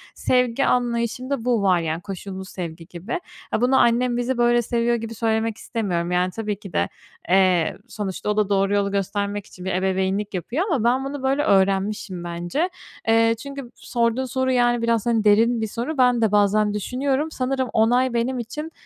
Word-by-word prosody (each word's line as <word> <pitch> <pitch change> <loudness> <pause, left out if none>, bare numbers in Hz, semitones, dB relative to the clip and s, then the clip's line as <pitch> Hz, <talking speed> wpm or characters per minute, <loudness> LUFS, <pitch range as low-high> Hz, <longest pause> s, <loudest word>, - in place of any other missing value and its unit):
sevgi 250 +1 +1
anlayışımda 245 +1 -1
bu 240 -4 +2
var, 185 -3 +3
yani, 165 0 -2
koşullu 190 0 -7
sevgi 170 -3 -7
gibi. 180 - -5 0.3
Ha, - - 0
bunu 255 +2 +4
annem 240 +1 +3
bizi 245 +1 -1
böyle 240 0 +4
seviyor 235 0 0
gibi 225 -1 -5
söylemek 220 0 0
istemiyorum. 180 -8 -2
Yani, 180 +1 +1
tabii 210 0 -4
ki 195 -5 -11
de, - - +1 0.4
eee, 185 -3 +3
sonuçta 205 -1 -4
o 210 - 0
da 210 -2 +2
doğru 195 0 +2
yolu 200 -1 +1
göstermek 200 +1 -2
için 180 -3 -12
bir 190 - -1
ebeveynlik 190 +2 0
yapıyor 235 - -2
ama 270 -9 +1
ben 255 +3 +2
bunu 275 0 -5
böyle 270 +2 +1
öğrenmişim, 195 - +1
bence. 175 - -2 0.4
Eee, 225 0 +4
çünkü 275 -3 -8
sorduğun 235 +2 -1
soru, 260 +1 -1
yani, 240 -1 +2
biraz, 230 -2 +1
hani, 230 -2 +2
derin 225 +3 +4
bir 220 - -1
soru, 240 +8 -4
ben 250 -2 +4
de 220 -3 +2
bazen 210 0 +3
düşünüyorum. 270 +8 -1
Sanırım 260 -2 -1
onay 245 +3 +3
benim 245 +2 0
için 300 +7 -6
225 Hz, 180 wpm, -23 LUFS, 195-250 Hz, 0.4 s, bunu